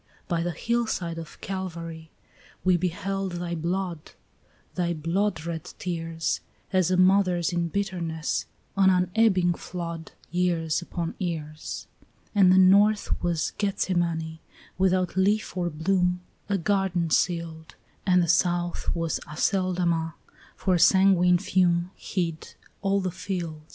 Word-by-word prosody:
By 170 -3 0
the 175 - -1
hillside 185 -3 -1
of 165 - -10
Calvary 165 -4 -5 0.5
we 185 -1 +4
beheld 185 +2 -2
thy 175 0 -3
blood, 170 0 -3 0.6
Thy 175 -2 -1
bloodred 165 0 -2
tears, 165 -2 -2 0.3
As 185 -2 +3
a 185 - +2
mother's 185 -2 +3
in 170 -1 0
bitterness, 170 -4 -2 0.3
an 195 -1 +5
unebbing 185 0 +3
flood, 170 -2 -6 0.2
Years 175 -2 +1
upon 170 -1 -4
years. 155 -4 -4 0.5
And 195 -3 +6
the 185 - +6
north 200 +3 +4
was 170 -3 0
Gethsemane, 170 -5 -1 0.4
without 185 -1 +1
leaf 200 +3 +1
or 175 -1 0
bloom, 180 +3 +1 0.3
A 200 - +2
garden 180 -2 0
sealed; 165 -2 -1 0.3
And 180 -2 +4
the - - -1
south 175 0 +1
was 165 -1 -1
Aceldama, 170 -1 0 0.4
for 190 - 0
a 175 - +2
sanguine 185 -1 +5
fume 175 -1 +1
Hid 170 -4 -4 0.3
all 195 0 +1
the 185 -1 -2
field. 170 -4 -4
175 Hz, 120 wpm, -26 LUFS, 165-190 Hz, 0.6 s, And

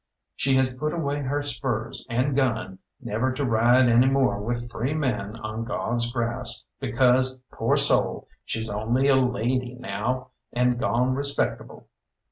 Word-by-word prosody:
She 135 0 +1
has 130 -1 +2
put 150 +4 -3
away 145 -3 -2
her 145 +2 -1
spurs 130 -6 -3
and 130 +4 0
gun 115 -8 -1 0.2
never 115 +5 -1
to 140 +1 -2
ride 120 +2 +4
any 120 +2 +5
more 130 -7 +2
with 120 +2 -4
free 130 +8 -2
men 115 -8 -2
on 110 +1 -4
God's 120 0 -1
grass, 120 0 -1
because, 130 0 +2
poor - - +1
soul! - - +2 0.2
she's 110 0 -3
only 115 +6 0
a 135 - +6
lady 125 0 0
now 130 0 -3 0.2
and 125 0 +1
gone 125 +2 +1
respectable. 140 +1 -1
125 Hz, 145 wpm, -25 LUFS, 115-130 Hz, 0.2 s, a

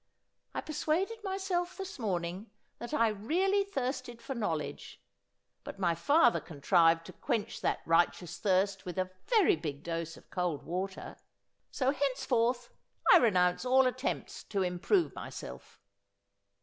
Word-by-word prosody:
I - - -1
per 310 - -7
suaded 380 +9 -1
myself 380 -2 -2
this 385 -6 -7
morning 185 -1 -3 0.3
that 240 - -6
I 230 -7 +3
really 355 - +1
thirsted 255 -8 -4
for 235 +4 -5
knowledge; 170 - -4 0.6
but - - -8
my 175 -3 +2
father 280 - +4
contrived 165 +1 +3
to - - -10
quench 230 -6 -2
that - - 0
righteous 170 +1 +1
thirst 195 0 +1
with 180 -1 -6
a 185 0 -1 0.2
very 440 - +5
big 150 -2 -6
dose 165 -1 -4
of - - -19
cold 175 -6 -1
water 185 +3 -5 0.3
— - - -51
so 265 -1 +1
henceforth 250 -3 0 0.4
I - - +10
renounce 180 - +3
all 260 +1 +5
attempts 255 +1 -2
to 195 -2 -1
improve 185 - +1
myself.' - - -9
230 Hz, 140 wpm, -31 LUFS, 180-290 Hz, 0.6 s, I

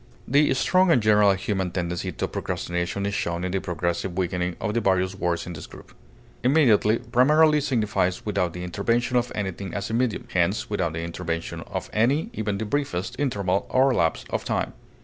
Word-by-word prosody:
The 145 +3 +4
strong 185 +7 +3
and 160 - +5
general 105 -2 +5
human 95 -1 -2
tendency 85 -1 -3
to - - -3
procrastination 90 +3 -3
is 100 - -2
shown 85 -2 -2
in 90 - -2
the 95 0 -1
progressive 85 +1 -2
weakening 90 -1 -1
of 105 -2 -2
the 115 - +1
various 95 -2 +1
words 85 -3 -1
in 90 - -6
this 75 - -8
group. - - -14 0.5
Immediately 120 -6 +4
primarily 150 +4 +5
signifies 105 -9 0
without 95 -5 0
the 90 - -6
intervention 115 +7 0
of 120 0 +1
anything 95 -2 -4
as 100 +1 -3
a - - -3
medium, 120 -1 0
hence 90 +4 0
without 90 -6 0
the 80 +1 -4
intervention 85 -1 -4
of - - -4
any, 130 +9 +1
even 105 -2 -2
the 110 - -3
briefest, 120 -3 -2
interval 100 -9 0
or 130 +1 +4
lapse 80 -7 0
of - - -1
time. - - -2
100 Hz, 185 wpm, -25 LUFS, 90-120 Hz, 0.5 s, and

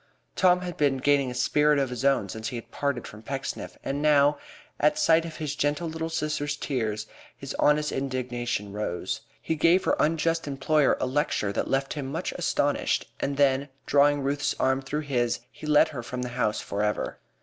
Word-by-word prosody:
Tom 180 -1 +4
had 180 -2 -5
been 140 -2 +2
gaining 140 0 +2
a 125 - -6
spirit 150 +3 +3
of 135 -2 0
his 125 0 -4
own 135 -7 +3
since 110 +3 -5
he 125 - -4
had 115 - -8
parted 140 -4 -2
from 105 - -10
Pecksniff, 135 +3 -5
and, 140 +1 -2
now, 145 -1 +4 0.4
at 150 +1 +3
sight 165 +1 +4
of 165 -2 -7
his 150 -2 -3
gentle 150 +4 0
little 160 0 -4
sister's 150 -2 -2
tears, 110 -7 -2 0.3
his 140 0 -6
honest 150 0 +3
indignation 125 -5 -3
rose. 105 -4 -3 0.2
He - - -2
gave 170 +4 +4
her - - +2
unjust 165 +1 +1
employer 140 +1 +2
a - - 0
lecture 130 -6 0
that - - -2
left 135 0 0
him 145 -3 -4
much 135 - -3
astonished, - - 0
and 140 0 -2
then, 140 0 +3 0.2
drawing 145 0 +4
Ruth's 140 +1 0
arm 130 +1 +2
through 145 +3 -3
his, 120 -6 0
he 155 - -9
led 150 -1 +5
her 135 -5 -5
from 125 +1 -5
the 125 - -4
house 115 -3 -1
for 100 - -3
ever. 105 0 -1
140 Hz, 195 wpm, -27 LUFS, 125-150 Hz, 0.4 s, led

